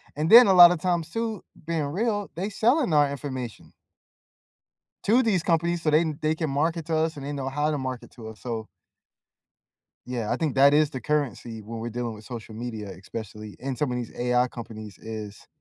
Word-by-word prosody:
and 155 Hz, +2 st, -1 dB
then 235 Hz, 0 st, +10 dB
a 190 Hz, -, +5 dB
lotta 175 Hz, -1 st, +9 dB
times 170 Hz, -1 st, -1 dB
too, 225 Hz, +1 st, -3 dB, 0.2 s
being 165 Hz, -2 st, -1 dB
real, 205 Hz, +4 st, -1 dB
they 190 Hz, +5 st, -3 dB
selling 240 Hz, -, +2 dB
our 145 Hz, -1 st, +4 dB
information 130 Hz, -5 st, -6 dB, 1.3 s
to 240 Hz, +5 st, +4 dB
these 200 Hz, -7 st, +1 dB
companies 170 Hz, 0 st, +1 dB
so, 155 Hz, -, +2 dB
they 155 Hz, +2 st, +4 dB, 0.2 s
they 155 Hz, +1 st, +2 dB
can 160 Hz, -1 st, -2 dB
market 160 Hz, +3 st, -1 dB
to 160 Hz, -1 st, 0 dB
us, 160 Hz, -1 st, 0 dB
and 140 Hz, -, -7 dB
they 145 Hz, -, -3 dB
know 135 Hz, -2 st, -3 dB
how 150 Hz, +3 st, 0 dB
to 150 Hz, -, -1 dB
market 130 Hz, -2 st, -5 dB
to 110 Hz, -3 st, -10 dB
us, 110 Hz, -, -11 dB
so 115 Hz, -3 st, -4 dB, 1.4 s
Yeah, 120 Hz, -4 st, -3 dB
I -, -, +1 dB
think 155 Hz, -5 st, -1 dB
that 140 Hz, +2 st, +6 dB
is 150 Hz, -1 st, +4 dB
the 130 Hz, -, -6 dB
currency 120 Hz, -5 st, -2 dB
when 115 Hz, +2 st, -7 dB
we're 115 Hz, -, -4 dB
dealing 120 Hz, 0 st, -4 dB
with 105 Hz, 0 st, -13 dB
social 115 Hz, -2 st, -8 dB
media, 110 Hz, -3 st, -6 dB
especially 105 Hz, 0 st, -8 dB
in 135 Hz, +1 st, -4 dB
some 140 Hz, 0 st, -1 dB
of 125 Hz, -, -2 dB
these 120 Hz, -2 st, -5 dB
AI 125 Hz, +1 st, +2 dB
companies, 110 Hz, -5 st, -9 dB
is 110 Hz, -2 st, -8 dB
140 Hz, 200 wpm, -26 LUFS, 115-165 Hz, 1.4 s, then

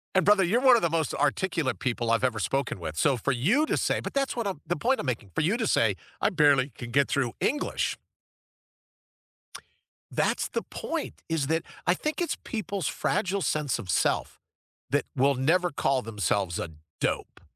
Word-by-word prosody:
And 190 Hz, -, +4 dB
brother, 205 Hz, -1 st, +5 dB
you're 195 Hz, +7 st, +2 dB
one 260 Hz, -2 st, +7 dB
of 235 Hz, -, +2 dB
the 170 Hz, -, +2 dB
most 160 Hz, -2 st, 0 dB
articulate 150 Hz, 0 st, 0 dB
people 120 Hz, -2 st, -1 dB
I've 115 Hz, +2 st, +2 dB
ever 120 Hz, -4 st, +1 dB
spoken 135 Hz, -1 st, -1 dB
with, 80 Hz, -2 st, -6 dB
so 140 Hz, -3 st, +3 dB
for 125 Hz, +4 st, -1 dB
you 195 Hz, -, +2 dB
to -, -, +1 dB
say -, -, +1 dB
but -, -, -6 dB
that's 275 Hz, -2 st, 0 dB
what 235 Hz, -3 st, -1 dB
I'm 190 Hz, -7 st, -3 dB
the 175 Hz, -, -1 dB
point 255 Hz, -, +1 dB
I'm -, -, -3 dB
making, 110 Hz, -6 st, -3 dB
for -, -, +2 dB
you 185 Hz, +8 st, +2 dB
to 225 Hz, -, 0 dB
say, -, -, +3 dB, 0.2 s
"I -, -, +2 dB
barely 145 Hz, -5 st, +4 dB
can 120 Hz, -, -7 dB
get 140 Hz, +1 st, +3 dB
through 130 Hz, -4 st, 0 dB
English." 295 Hz, -, -1 dB, 2.1 s
That's -, -, 0 dB
the -, -, -2 dB
point, 325 Hz, -2 st, -5 dB
is 160 Hz, -4 st, 0 dB
that 160 Hz, +1 st, +1 dB, 0.2 s
I 175 Hz, -, +5 dB
think 305 Hz, -, -3 dB
it's 345 Hz, -, -1 dB
people's 200 Hz, -, -3 dB
fragile 190 Hz, +1 st, 0 dB
sense 150 Hz, -5 st, 0 dB
of 90 Hz, -, -8 dB
self, -, -, 0 dB, 0.5 s
that -, -, +2 dB
will 135 Hz, +1 st, +3 dB
never 175 Hz, +7 st, +2 dB
call 135 Hz, -2 st, +1 dB
themselves 100 Hz, -5 st, -1 dB
a 85 Hz, -, -3 dB, 0.3 s
dope, -, -, -2 dB
150 Hz, 190 wpm, -27 LUFS, 130-195 Hz, 2.1 s, one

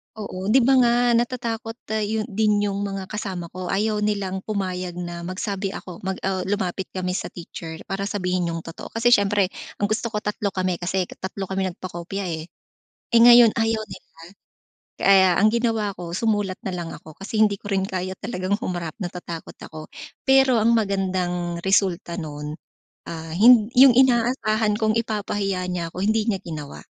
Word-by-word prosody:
Oo 195 Hz, -3 st, -6 dB
di 245 Hz, +4 st, +5 dB
ba 265 Hz, +2 st, +5 dB
nga 240 Hz, -1 st, +4 dB, 0.2 s
natatakot 235 Hz, -1 st, -1 dB, 0.2 s
ah, 220 Hz, -, 0 dB
yun 215 Hz, +1 st, -1 dB
din 210 Hz, 0 st, +2 dB
yung 200 Hz, 0 st, -1 dB
mga 195 Hz, -1 st, -5 dB
kasama 190 Hz, -5 st, -4 dB
ko, 185 Hz, 0 st, -6 dB
ayaw 210 Hz, +2 st, 0 dB
nilang 200 Hz, -2 st, -1 dB
pumayag 185 Hz, -4 st, -3 dB
na 175 Hz, -1 st, -6 dB
magsabi 195 Hz, +1 st, -3 dB
ako, 180 Hz, -2 st, -8 dB
mag 190 Hz, -1 st, -3 dB
ah, 185 Hz, -1 st, -1 dB
lumapit 190 Hz, -2 st, -2 dB
kami 185 Hz, -1 st, -2 dB
sa -, -, -4 dB
teacher 165 Hz, -1 st, -8 dB
para 195 Hz, +1 st, -4 dB
sabihin 180 Hz, -3 st, -1 dB
yung 165 Hz, -1 st, -3 dB
totoo. 165 Hz, -, -9 dB
Kasi 235 Hz, +2 st, +3 dB
siyempre 200 Hz, -3 st, +3 dB, 0.2 s
kung 205 Hz, 0 st, -1 dB
gusto 220 Hz, +2 st, 0 dB
ko 210 Hz, -, -1 dB
tatlo 210 Hz, -1 st, -2 dB
kami 185 Hz, -2 st, -1 dB
kasi 185 Hz, +1 st, -1 dB
ka -, -, -12 dB
tatlo 190 Hz, 0 st, -5 dB
kami 190 Hz, 0 st, 0 dB
nag-pakopya, 185 Hz, +1 st, -5 dB
eh. 160 Hz, 0 st, -4 dB, 0.7 s
Eh, -, -, +8 dB
ngayon 240 Hz, -2 st, +8 dB
ayaw 225 Hz, -1 st, +1 dB
nila, -, -, -12 dB, 0.9 s
kaya 190 Hz, -1 st, +6 dB
ang 215 Hz, -, +5 dB
ginawa 225 Hz, -4 st, 0 dB
ko 175 Hz, -1 st, -6 dB
sumulat 205 Hz, -2 st, 0 dB
nalang 175 Hz, -3 st, -4 dB
ako 155 Hz, -, -12 dB
kasi 215 Hz, +2 st, -3 dB
hindi 210 Hz, -2 st, +4 dB
ko 205 Hz, -, -8 dB
rin 190 Hz, -1 st, +1 dB
kaya 185 Hz, -1 st, -3 dB
talagang 195 Hz, -2 st, -2 dB
humarap 175 Hz, -5 st, -3 dB
natatakot 175 Hz, -2 st, -6 dB
ako. 155 Hz, -1 st, -9 dB, 0.4 s
Pero 265 Hz, -2 st, +5 dB
ang 235 Hz, +1 st, +4 dB
magandang 185 Hz, -5 st, -1 dB
resulta 190 Hz, -3 st, +1 dB
nun, 150 Hz, -1 st, -5 dB, 0.6 s
ah, 160 Hz, -1 st, -6 dB
hin 220 Hz, +3 st, +6 dB
yung 260 Hz, -1 st, +9 dB
inaasahan 230 Hz, -4 st, +3 dB
kong 215 Hz, -1 st, +1 dB
ipapahiya 200 Hz, -4 st, -2 dB
niya 175 Hz, -2 st, -3 dB
ako 185 Hz, -, -5 dB
hindi 220 Hz, 0 st, +2 dB
niya 195 Hz, -, +1 dB
ginawa. 150 Hz, -4 st, -7 dB
195 Hz, 170 wpm, -23 LUFS, 180-215 Hz, 0.9 s, yung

